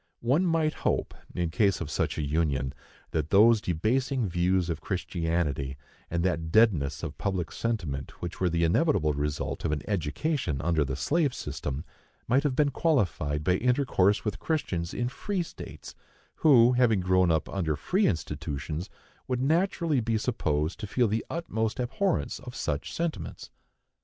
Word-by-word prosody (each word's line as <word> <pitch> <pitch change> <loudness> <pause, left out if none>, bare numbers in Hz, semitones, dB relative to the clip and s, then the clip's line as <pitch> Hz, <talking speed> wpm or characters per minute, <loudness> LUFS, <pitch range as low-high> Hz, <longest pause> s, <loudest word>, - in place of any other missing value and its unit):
One 140 +10 +2
might 160 -2 +2
hope, - - 0 0.2
in 85 -2 -1
case 100 0 +2
of 80 -3 -5
such - - -1
a 75 - -1
union, 70 -3 0 0.4
that 80 -1 -1
those 110 +3 +6
debasing 120 - 0
views 90 0 +1
of 80 -3 -3
Christianity, 80 -7 -2 0.3
and 85 0 -1
that 80 -3 -1
deadness 80 - +3
of 80 -3 -5
public 95 -5 -2
sentiment, 85 -13 -3
which 85 -1 -6
were 90 - +3
the 85 0 +1
inevitable 85 - +2
result 75 +1 -3
of - - 0
an 75 -2 -2
education 100 - -1
under 80 -1 +2
the 65 -1 -3
slave 140 - +1
system, 70 +3 -4 0.4
might 130 +4 +4
have 145 -3 0
been 145 0 +3
qualified 85 - +1
by 90 +1 +2
intercourse 120 -6 +2
with 105 -2 -2
Christians 90 - -2
in 120 - -1
free 185 +8 -2
states, 165 - -10 0.4
who, 125 -6 +6
having 120 -5 +3
grown 95 0 +3
up 80 -2 +1
under 85 -6 -1
free 190 - +1
institutions, 75 -1 -3 0.4
would 125 -1 -1
naturally 165 +1 +1
be 115 -1 0
supposed 80 -9 -1
to 105 - -5
feel 120 +3 +2
the 110 +2 -1
utmost 115 -10 -2
abhorrence 135 +10 -1
of 125 -2 -9
such 75 -1 -2
sentiments. 170 -1 -4
95 Hz, 155 wpm, -28 LUFS, 80-125 Hz, 0.4 s, those